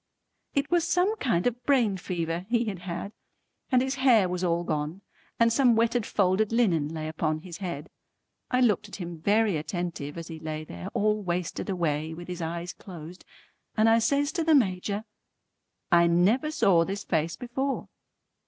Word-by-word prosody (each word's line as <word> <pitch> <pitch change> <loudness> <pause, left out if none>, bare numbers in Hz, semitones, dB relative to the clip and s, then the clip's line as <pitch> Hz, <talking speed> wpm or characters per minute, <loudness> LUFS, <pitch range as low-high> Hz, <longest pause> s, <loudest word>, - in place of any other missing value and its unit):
It 280 +3 0
was 340 -2 +3
some 370 +5 +2
kind 205 - 0
of 245 0 -1
brain 240 -7 +3
fever 170 -1 -3
he 235 0 +2
had 200 -5 -4
had, 180 +2 -5 0.6
and 255 -1 +4
his 265 0 -1
hair 230 -8 +5
was 180 0 -3
all 170 -1 +1
gone, 155 +3 -3 0.4
and 230 0 +4
some 245 -2 +4
wetted 230 0 +1
folded 200 +2 +2
linen 175 -11 +2
lay 155 -1 -4
upon 155 0 -1
his 170 -1 -8
head. 170 -6 -5 0.6
I 250 0 +2
looked 220 -7 +2
at - - -8
him 170 -3 -6
very 205 0 +3
attentive 160 -2 -4
as 165 -1 -6
he 160 -2 -8
lay 155 -1 -4
there 85 - -8
all 210 0 +2
wasted 180 0 -3
away 160 -3 -1
with 175 +1 -9
his 180 -1 -5
eyes 170 +2 -4
closed, 175 -1 -10 0.5
and 215 +1 +5
I 225 +1 +5
says 280 +5 +1
to 340 -3 -1
the 320 -1 +5
Major 200 -3 +1 0.9
"I 170 0 +6
never 195 - +3
saw 190 - +4
this 195 +3 -4
face 160 -1 0
before." 265 +6 -3
185 Hz, 175 wpm, -27 LUFS, 170-230 Hz, 0.9 s, I